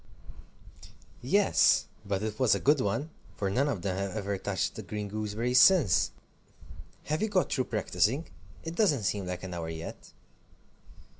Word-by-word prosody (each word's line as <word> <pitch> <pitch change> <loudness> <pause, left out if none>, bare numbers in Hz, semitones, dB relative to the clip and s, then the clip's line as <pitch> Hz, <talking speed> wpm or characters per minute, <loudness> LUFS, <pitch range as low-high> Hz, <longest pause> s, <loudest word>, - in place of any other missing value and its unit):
"Yes, - - +3 0.2
but 100 -1 -2
it 110 -1 -4
was 125 -6 +4
a - - -2
good 145 +3 +3
one, 135 +10 -2 0.2
for 100 -2 -2
none 140 +7 +1
of 100 -11 -3
them 95 -2 -1
have 100 +2 -3
ever 100 -1 -2
touched - - -2
the - - -7
green 105 -1 -5
gooseberries 110 +5 +1
since. 165 - +5 0.9
Have 155 +1 -2
you 220 - 0
got 185 -3 +1
through 130 - 0
practising? 110 - 0 0.4
It 165 - -5
doesn't 170 - +2
seem 100 -1 -1
like 90 0 -5
an 95 -1 -6
hour 85 -2 -4
yet." 80 0 -8
105 Hz, 160 wpm, -29 LUFS, 95-140 Hz, 0.9 s, since